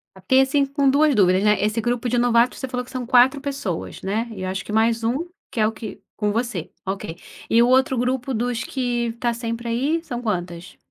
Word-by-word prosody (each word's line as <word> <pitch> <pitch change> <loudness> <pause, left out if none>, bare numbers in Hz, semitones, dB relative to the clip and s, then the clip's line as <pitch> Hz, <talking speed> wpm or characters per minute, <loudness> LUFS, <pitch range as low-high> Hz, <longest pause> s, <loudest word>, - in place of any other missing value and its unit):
Fiquei 225 +8 +3
assim, 275 +1 +2
com 275 0 +1
2 295 +2 +4
dúvidas, 190 -3 +3
né, 210 -2 +3
esse 215 +2 0
grupo 240 +1 -1
de 245 - +1
novatos, 240 0 +3
você 265 - -4
falou 250 -1 -3
que 250 - -15
são 255 -2 -4
4 255 +3 +5
pessoas, 275 - -4
né, 215 +5 -1
e 195 - -8
eu 185 - -2
acho 195 +1 -4
que - - -7
mais 225 +1 +2
1, 270 +10 -1 0.2
que 230 - -4
é 215 - +4
o 220 - -1
que 220 -1 -9
com 210 -1 0
você, 225 -7 -3
ok, 190 -3 -4 0.3
e 230 - +5
o 240 - +5
outro 260 0 +3
grupo 250 +2 -1
dos 240 +1 -1
que 245 -3 -1
está 235 +1 -2
sempre 230 0 -4
aí 280 +8 0
são 245 -7 -5
quantas? 180 -4 -4
235 Hz, 225 wpm, -22 LUFS, 215-255 Hz, 0.3 s, 4